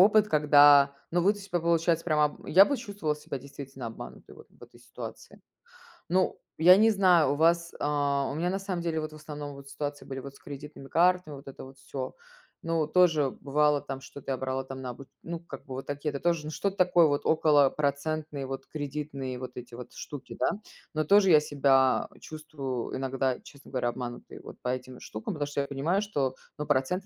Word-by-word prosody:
опыт, 210 +2 +6
когда, 145 -2 +6 0.2
ну, 175 - +2
вы, 200 - +5
то 205 - -10
типа 185 -3 -2
по 165 - -8
получается 165 0 +2
прямо 155 -3 +3
об 150 - -4
я 190 +4 +8
бы 280 - -1
чувствовала 200 - -3
себя 145 -2 -6
действительно 135 -2 -9
обманутой 115 - -10
вот - - -14
в - - -23
этой - - -15
ситуации. - - -10 0.7
Ну, 185 +1 +1 0.2
я 175 +4 +8
не 220 +1 +5
знаю, 180 -7 +4
у - - -2
вас 170 +2 +2
а, 145 -1 0
у - - -5
меня, 175 +3 0
на 195 +1 -1
самом 190 -3 -3
деле, 165 -2 -1
вот 155 0 -4
в - - -10
основном 150 -1 -7
вот 140 0 -12
ситуации 145 +1 -5
были 135 -1 -6
вот 140 +1 -9
с - - -17
кредитными 145 -1 -9
картами, 180 -2 +2
вот 135 - -13
это 135 - -9
вот 135 0 -13
всё. 130 -1 -6 0.5
Ну, 165 -2 +1
тоже 160 -5 +4
бывало 150 +1 +2
там, 135 0 -6
что-то 135 0 -8
я 130 - -1
брала 130 +1 -2
там 130 0 -8
на 125 -1 -4
обу 135 +2 -11 0.2
ну, 170 0 -6
как 140 -5 -10
бы 130 - -8
вот 135 - -6
такие 145 +1 -3
это 140 - -4
тоже 170 -3 +1
ну 155 - -4
что-то 195 +6 -2
такое 175 -2 +5
вот, 145 0 -1
около 150 -3 +4
процентные, 145 0 -2
вот 135 0 -6
кредитные, 140 -3 -5
вот 125 0 -6
эти 120 -1 -9
вот 125 0 -9
штуки, 145 -3 -9
да. - - +2 0.4
Но 155 0 0
тоже 200 +3 +5
я 155 -3 +7
себя 135 -3 +3
чувствую 145 -6 -5
иногда, 130 -1 -1
честно 140 -1 -15
говоря, 125 -2 0
обманутой 120 0 -7
вот - - -11
по 125 - -3
этим 130 0 -5
штукам, 110 0 -5
потому 145 -2 -3
что 145 - -3
я 140 - -3
понимаю, 160 +8 0
что, 140 -11 -1 0.2
ну, 150 - -3
процент 145 +7 0
145 Hz, 215 wpm, -28 LUFS, 135-165 Hz, 0.7 s, я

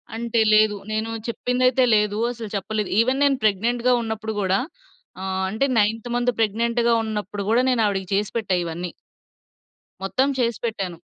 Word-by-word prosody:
అంటే 235 0 -1
లేదు. 215 -1 +5 0.2
నేను 220 +1 -2 0.2
చెప్పిందైతే 250 +2 +1
లేదు. 210 0 +1
అసలు 225 -3 -7
చెప్పలేదు. 210 +1 -2
ఈవెన్ 260 +4 +2
నేను 275 -2 +3
ప్రెగ్నెంట్‌గా 235 +5 +2
ఉన్నప్పుడు 220 -1 -4
గూడా, 190 0 +1 0.6
ఆహ్, 190 0 -2
అంటే 220 +7 0
నైన్త్ 225 +3 0
మంత్ 245 0 +2
ప్రెగ్నెంట్‌గా 235 +2 +1
ఉన్నప్పుడు 210 -2 -4
గూడా, 240 +3 +3
నేను 230 -3 +2
ఆవిడకి 195 -2 -2
చేసి 205 +1 0
పెట్టా 200 -5 0
ఇవన్నీ. 170 +1 -5 1.1
మొత్తం 260 +8 +1
చేసి 235 -1 +1
పెట్టాను. 195 -6 -3
220 Hz, 145 wpm, -23 LUFS, 205-235 Hz, 1.1 s, లేదు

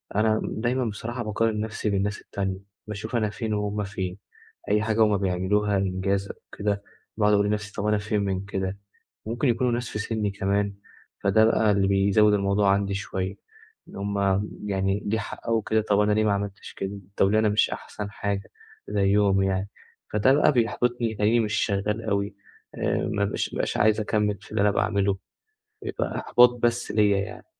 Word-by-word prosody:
أنا 110 +1 +2
دايمًا 120 +3 -1
بصراحة 115 +3 -4
باقارن 105 +1 0
نَفسي 110 0 -2
بالناس 100 +1 -1
التانية، 95 -1 -3 0.3
باشوف 105 +3 -5
أنا 110 -3 +1
فين 110 +1 -3
وهُم 105 0 -1
فين، 95 -2 -4 0.5
أي 105 +1 +3
حاجة 110 0 +3
هُم 105 -2 +3
بيعملوها، 100 +2 +1
إنجاز 95 +1 0
أو - - -6 0.2
كده 100 0 -1 0.3
باقعُد 105 -1 +3
أقول 100 0 +4
لنفسي 105 0 -2
طَب 100 - -3
أنا 105 - +3
فين 105 0 -1
من 95 -1 -2
كده؟ 95 -1 -3 0.5
ممكن 120 +5 0
يكونوا 120 +1 +2
ناس 120 0 -2
في - - -4
سني 105 -1 -1
كمان 100 +1 0 0.5
فده 105 +2 +5
بقى 110 -1 +3
اللي 100 -1 +2
بيزوّد 100 +2 +4
الموضوع 100 0 +2
عندي 100 0 0
شوية، 95 -2 -3 0.5
إن - - -12
هُم 100 0 -2 0.5
يعني 95 0 0
ليه 110 +2 +1
حققوا 115 +2 -3
أو 110 - 0
كده 110 +1 +1
طبعًا 105 0 +2
أنا 105 - +2
ليه 110 +1 +2
ما 105 - +3
عملتش 100 0 -4
كده، 100 +1 -5 0.2
طَب 95 - +4
ليه 110 - +3
أنا 110 0 +3
مش 105 0 +2
أحسَن 105 -1 -6
حاجة 100 -1 -3 0.4
زيّهم 100 -1 +3
يعني، 95 +1 0 0.4
فده 105 +5 +4
بقى 150 - +4
بيحبِطني، 120 -1 0
تلاقيني 110 +3 +3
مش 105 -2 -1
شغّال 105 +2 0
أوي 100 -1 -1 0.4
آآ، - - 0 0.2
ما 100 - +1
بابقاش 100 - -2
مش - - -1
عايز 110 +1 +3
أكمِّل 105 -1 0
في - - -16
اللي 105 -1 +1
أنا 105 - +4
باعمله 100 -1 +1 0.7
يبقى - - -3
إحباط 125 0 +6
بس 120 0 +1
ليَّ 105 -1 +4
يعني، 100 +2 -2
105 Hz, 180 wpm, -25 LUFS, 100-110 Hz, 0.7 s, إحباط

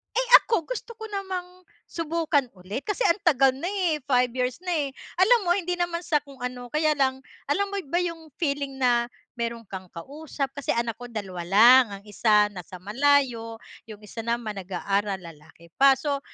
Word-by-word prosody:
eh - - +1 0.2
ako 405 -9 -1
gusto - - -5
ko 445 - -6
namang 370 -2 -5 0.3
subukan 320 -4 0
uli' 195 +9 -6
kasi 415 +2 -2
ang 335 - +2
tagal 270 -5 +5
na 305 +7 -4
eh, 365 -6 0
5 250 -3 +2
years 250 +1 -2
na 360 - -1
eh. 290 -4 0 0.3
Alam 465 +6 +6
mo - - +4
hindi 360 -2 -2
naman 345 -1 -1
sa 300 - +2
kung 275 -2 -15
ano, 250 0 -5
kaya 305 0 +2
lang, 265 -1 +1 0.3
alam 400 +7 +1
mo 400 - -1
ba 345 - +1
yung 330 -2 -5
feeling 280 -3 -1
na 240 -2 +2 0.3
meron 235 0 -3
kang 190 -1 -8
kausap, 280 - -5
kasi 285 -2 -2
anak 235 -2 -1
ko 245 - -8
2 195 -6 -5
lang, 235 +7 +8 0.2
ang - - -23
1 210 0 +3
nasa 180 -1 -9
malayo, 235 0 +1 0.3
yung 210 -1 -9
1 220 - -9
naman 235 -2 -2
nag-aaral, 195 +2 -1
lalaki 165 0 -15
pa. 275 0 +7
So 285 -1 -1
270 Hz, 185 wpm, -25 LUFS, 225-330 Hz, 0.3 s, lang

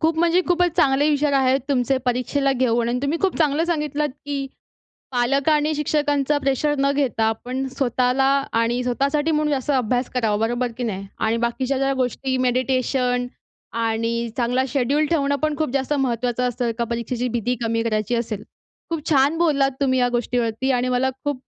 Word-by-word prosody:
खूप 320 0 +1
म्हणजे 345 +1 +3
खूपच 355 0 +3
चांगले 290 -3 +3
विचार 290 0 +1
आहेत 265 0 +3
तुमचे 265 -1 +1
परीक्षेला 260 +3 +1
घेऊन. 240 -2 +1
आणि 245 +1 0
तुम्ही 290 +4 0
खूप 385 - +1
चांगलं 310 0 +2
सांगितलत, 300 -3 -1 0.2
की 280 -1 -2 0.7
पालक 265 +4 +1
आणि 305 0 +2
शिक्षकांचं 295 -1 +1
प्रेशर 285 +2 0
न 275 +1 +2
घेता, 260 -6 0
आपण 250 +4 -2
स्वतःला 255 0 +1 0.3
आणि 230 +2 +1
स्वतःसाठी 280 +5 0
म्हणून 300 -1 +1
जास्त 275 +1 -1
अभ्यास 250 -1 0
करावा. 225 -4 +1
बरोबर 240 0 -2
की 245 - -2
नाही? 195 -3 -4
आणि 225 +1 +1
बाकीच्या 260 +3 -2
ज्या 270 0 +1
गोष्टी 260 +1 -1
मेडिटेशन 250 0 0 0.6
आणि 230 +1 -1
चांगला 250 +1 +1
शेड्यूल 285 +3 +1
ठेवणं 285 -3 +1
पण 305 -1 0
खूप 310 -5 0
जास्त 275 +1 -1
महत्त्वाचं 250 -1 0
असतं 245 0 -2
एका 235 +1 -2
परीक्षेची 235 +1 -2
भीती 240 +1 -1
कमी 230 0 0
करायची 215 0 -1
असेल. 225 -3 -2 0.5
खूप 330 -1 -3
छान 285 +3 +3
बोललात 285 -5 +3
तुम्ही 260 -2 +2
ह्या 245 0 +3
गोष्टीवरती. 240 +1 -1
आणि 250 0 0
मला 255 +1 +1
खूप 290 -3 -2
260 Hz, 170 wpm, -22 LUFS, 240-290 Hz, 0.7 s, म्हणजे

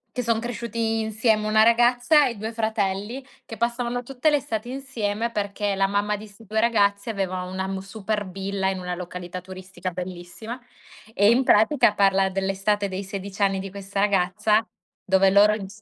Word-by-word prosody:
Che 250 - 0
son 230 -2 +1
cresciuti 230 -1 -2
insieme, 220 0 +1
1 215 0 +5
ragazza, 245 +6 +4
e 240 - -4
2 220 +2 -5
fratelli, 220 +2 -2 0.2
che 225 - -9
passavano 240 +2 -1
tutte 270 +4 0
le 300 - +3
estati 230 -3 -4
insieme, 235 -4 -3
perché 205 -1 -2
la 195 0 +2
mamma 205 +1 0
di 215 +2 -10
'sti 210 +2 -17
2 215 +2 -1
ragazzi 205 -2 +2
aveva 190 -4 -2
una 190 +1 -4
m 190 0 -3
super 205 +1 -4
villa, 195 +1 -2
in 190 - -2
una 180 -1 -4
località 180 0 -6
turistica 185 0 -7
bellissima, 180 +6 -7 0.5
e 205 +2 +5
in 250 +3 +3
pratica 230 -1 +4
parla 195 -1 +3
dell'estate 195 +2 0
dei 190 +1 -4
16 200 +1 -7
anni 195 -1 +3
di 190 0 -5
questa 195 0 -4
ragazza, 200 +2 +2 0.4
dove 190 0 +4
loro 205 +2 +6
ins 205 +1 -9
205 Hz, 175 wpm, -24 LUFS, 195-225 Hz, 0.5 s, loro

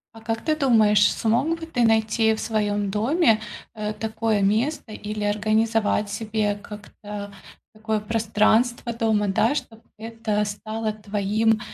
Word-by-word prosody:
А 225 - -12
как 225 0 -3
ты 310 - +2
думаешь, 215 -8 +4
смог 260 +9 0
бы 325 - -6
ты 265 -7 -1
найти 220 0 +2
в - - -8
своём 205 -2 -1
доме, 225 - +2 0.3
э, 215 -1 -4
такое 220 -1 -1
место 225 +6 0
или 210 0 -5
организовать 215 +1 +1
себе 210 0 -1
как-то 205 0 -9 0.4
такое 220 0 -2
пространство 225 +2 +1
дома, 220 -2 +1
да, 220 +7 +2
чтоб 225 -6 -6 0.2
это 220 -1 -2
стало 215 +2 -4
твоим, 215 +1 0
220 Hz, 135 wpm, -23 LUFS, 210-225 Hz, 0.4 s, думаешь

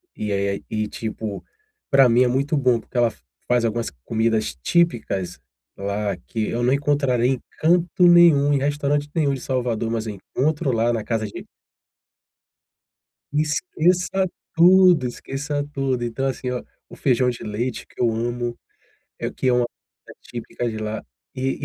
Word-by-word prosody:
e 105 - -3
aí, 100 0 -1
e, 110 -1 -1
tipo, 110 -1 -5 0.5
pra 135 -2 +7
mim 120 +2 +4
é - - +3
muito 140 +5 0
bom, 130 -4 +3
porque 115 - -21
ela 120 -1 +3 0.3
faz 120 -1 +2
algumas 115 +1 -1 0.2
comidas 110 -7 0
típicas 110 - 0 0.4
lá 100 0 -2
que 110 +5 -4
eu 120 +1 -2
não 125 - +3
encontrarei 140 -3 +2
em 130 - -1 0.2
canto 175 +2 +3
nenhum, 165 -5 +6
em - - +3
restaurante 145 +1 0
nenhum 150 -4 +1
de 135 - -5
Salvador, 120 -3 -1
mas 115 -1 -2
eu 105 - -4
encontro 145 - -1
lá 115 0 +1
na 115 -2 -2
casa 110 -1 -1
de 100 - -9 1.9
Esqueça 180 +5 +1 0.3
tudo, 180 -4 +6
esqueça 145 +4 -4
tudo. 135 -3 -1
Então, 120 +3 -2
assim, 130 -1 -3
ó, 125 - -2 0.3
o - - -11
feijão 125 -1 +2
de 120 - -6
leite 115 +4 -3
que - - -9
eu 120 - +4
amo, 120 +1 -2 0.6
eh, - - -3
que 130 - -2
é - - +4
uma 125 0 +3 0.6
típica 120 0 -5
de 110 - -5
lá, 110 0 -4 0.3
e 135 +1 -2
125 Hz, 160 wpm, -22 LUFS, 115-145 Hz, 1.9 s, pra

